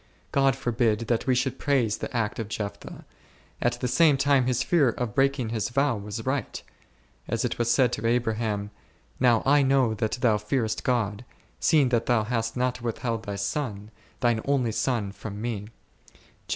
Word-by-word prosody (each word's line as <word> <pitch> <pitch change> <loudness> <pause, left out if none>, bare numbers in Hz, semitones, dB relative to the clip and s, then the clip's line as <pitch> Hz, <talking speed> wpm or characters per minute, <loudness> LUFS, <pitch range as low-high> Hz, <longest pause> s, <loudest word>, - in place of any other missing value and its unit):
God 135 -1 +3
forbid 120 -4 0
that 115 +2 -1
we 130 - +3
should 130 +1 -1
praise 125 -7 +1
the - - -5
act 115 -3 -2
of 115 - -3
Jeph 105 -1 -4
thah; - - -11 0.6
at 120 - +2
the 125 - -1
same 145 +3 +4
time 140 -2 +3
his 130 0 +1
fear 150 -6 +3
of 115 -2 -3
breaking 135 -2 +1
his 110 -1 -2
vow 135 +1 +1
was 105 +2 -6
right: 130 0 -2 0.7
as - - -1
it - - -3
was 120 0 +1
said 120 0 +3
to 115 - -1
Abraham, 110 -3 -1 0.5
Now 120 -3 +4
I 145 +2 +5
know 135 -4 +3
that 110 0 -2
thou 120 -5 +2
fearest 110 +1 -1
God, 115 -3 0 0.4
seeing 150 -5 +3
that 120 -2 0
thou 120 -3 +3
hast 115 +1 -2
not 125 0 -1
withheld 115 -1 -3
thy 100 - -4
son, 105 0 -3 0.3
thine 120 -2 +2
only 135 -5 +1
son 110 -3 -1
from 105 0 -8
Me 110 -3 -4
{. - - -30
120 Hz, 180 wpm, -26 LUFS, 110-130 Hz, 0.7 s, I